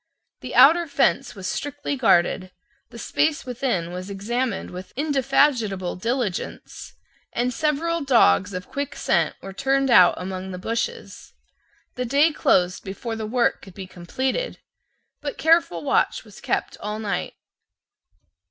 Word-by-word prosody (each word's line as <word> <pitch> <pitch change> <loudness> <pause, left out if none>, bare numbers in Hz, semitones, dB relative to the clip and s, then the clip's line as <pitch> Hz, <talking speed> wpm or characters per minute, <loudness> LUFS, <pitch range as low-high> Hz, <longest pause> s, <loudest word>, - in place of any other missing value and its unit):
The 255 - -7
outer 320 +7 +7
fence 275 -3 +1
was 190 -2 -8
strictly 290 0 -3
guarded: 185 -6 +2 0.4
the - - -12
space 310 -1 0
within 240 -9 -2
was 185 +2 -6
examined 235 +6 -3
with 180 +1 -9
indefatigable 270 - +1
diligence; 230 -1 -4 0.4
and 245 +1 0
several 320 +3 0
dogs 230 - +4
of 180 0 -6
quick 285 0 -4
scent - - +1
were 195 - -7
turned 270 +3 +1
out 180 -7 +7
among 185 +1 -5
the 185 - -6
bushes. 235 - -4 0.6
The 250 - -3
day 285 +6 +3
closed 180 -10 +2
before 225 +4 -5
the 220 -1 -4
work 240 +1 +1
could 190 - -14
be 195 - -7
completed: 260 - -3 0.6
but 285 - -5
careful 330 +1 +2
watch 280 - +1
was - - -15
kept - - -2
all 210 +1 -4
night. 205 -4 -3
245 Hz, 135 wpm, -23 LUFS, 190-280 Hz, 0.6 s, outer